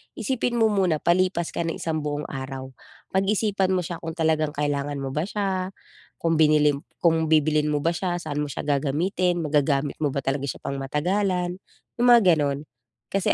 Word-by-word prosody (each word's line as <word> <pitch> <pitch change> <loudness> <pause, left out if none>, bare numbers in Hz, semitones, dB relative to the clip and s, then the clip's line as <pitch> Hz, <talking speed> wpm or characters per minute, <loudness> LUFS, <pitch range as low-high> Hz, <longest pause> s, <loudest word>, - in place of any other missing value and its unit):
isipin 250 -2 -1
mo 225 -2 +3
muna 185 -6 +1
palipas 175 -1 +2
ka - - -2
ng 165 - -2
isang 160 -1 -2
buong 150 0 -3
araw. 130 0 -6 0.4
Pag-isipan 195 -1 +1
mo 180 - 0
siya 170 +1 -5
kung 165 -1 -5
talagang 155 -2 +1
kailangan 145 0 -1
mo 135 - -3
ba 150 +5 -1
siya, 195 -2 -2 0.5
kung 165 -1 +2
binili 150 -1 +5 0.3
kung 160 -1 +3
bibilhin 155 -1 +3
mo 150 -1 0
ba 165 - +3
siya, 175 +1 -2
saan 145 -2 -4
mo 150 - 0
siya 140 - -5
gagamitin, 170 +5 0
magagamit 145 -1 +1
mo 145 -3 0
ba 140 - 0
talaga 135 +1 -1
siya - - -5
pangmatagalan, 175 +7 -1 0.4
yung 245 - +4
mga 235 - +7 0.2
ganon. 140 -1 0 0.5
Kasi 195 -1 +2
160 Hz, 175 wpm, -24 LUFS, 145-185 Hz, 0.5 s, mga